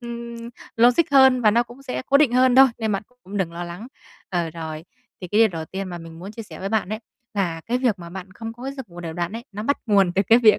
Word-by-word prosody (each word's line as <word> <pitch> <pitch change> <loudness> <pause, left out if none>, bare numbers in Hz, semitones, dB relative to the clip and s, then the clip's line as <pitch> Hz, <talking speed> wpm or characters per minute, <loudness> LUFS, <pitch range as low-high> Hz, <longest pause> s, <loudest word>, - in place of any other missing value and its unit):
ừm, 235 0 -7 0.4
logic 245 +7 +6
hơn 265 -2 +6
và 215 - +6
nó 235 +3 +3
cũng 240 +3 -14
sẽ 260 -1 -4
cố 280 - +5
định 280 -5 +4
hơn 255 0 +4
thôi, 270 0 +10
nên 220 -2 -1
bạn 195 - -1 0.2
cũng 200 +2 -7
đừng 175 -4 -1
lo 175 +1 -5
lắng. 175 +7 -8 0.4
Ờ, 175 -3 -1
rồi 160 -1 -6 0.4
thì 180 - -7
cái 210 - +1
điều 225 - +7
đầu 165 -3 -5
tiên 190 +2 -5
mà 175 -1 -6
mình 165 0 -11
muốn 195 +4 -8
chia 225 - -7
sẻ - - -11
với 195 - -3
bạn 215 -3 0
ấy, 215 +1 -3 0.4
là 170 -5 -1
cái 245 +2 0
việc 235 -7 +1
mà 170 -1 -9
bạn 190 +1 -8
không 225 +2 -7
có 240 +2 -13
cái 270 +1 -4
giấc 265 -6 -8
ngủ 175 0 -10
đều 165 -2 -5
đặn 175 +3 -3
ấy, 235 +2 -6
nó 210 +2 -5
bắt 285 +5 +1
nguồn 195 -4 +4
từ 195 - +3
cái 230 +2 +8
việc 220 -3 +6
210 Hz, 290 wpm, -23 LUFS, 175-240 Hz, 0.4 s, thôi